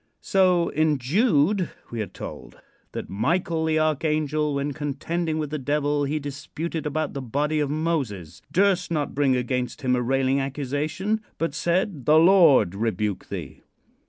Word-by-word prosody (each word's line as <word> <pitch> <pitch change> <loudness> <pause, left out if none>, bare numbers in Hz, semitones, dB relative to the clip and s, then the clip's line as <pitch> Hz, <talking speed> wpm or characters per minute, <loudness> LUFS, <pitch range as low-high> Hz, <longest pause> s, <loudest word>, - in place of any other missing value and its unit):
So 180 -3 +3
in 155 -1 +2
Jude 175 - +2 0.2
we 115 -2 -3
are 105 - -3
told 95 - -9 0.3
"that - - -5
Michael, 160 - 0
the 160 0 +1
archangel, 155 -1 0
when 140 +1 -1
contending 155 +3 -2
with 150 -2 -3
the 155 - -2
devil 145 +1 0
he 145 +2 -1
disputed 150 +3 -5
about 155 +1 -2
the 140 - -4
body 145 +5 -1
of 145 -2 0
Moses, 130 - -2
durst 190 -1 +2
not 150 -4 -1
bring 140 -2 +2
against 125 +1 -2
him 125 -1 +2
a 125 - 0
railing 135 +2 +1
accusation, 145 - -2 0.2
but 165 -3 -1
said, 170 - -1
'The 155 +1 +6
Lord 165 - +6
rebuke 105 -2 -2
thee.'" - - -7
150 Hz, 155 wpm, -24 LUFS, 135-165 Hz, 0.3 s, The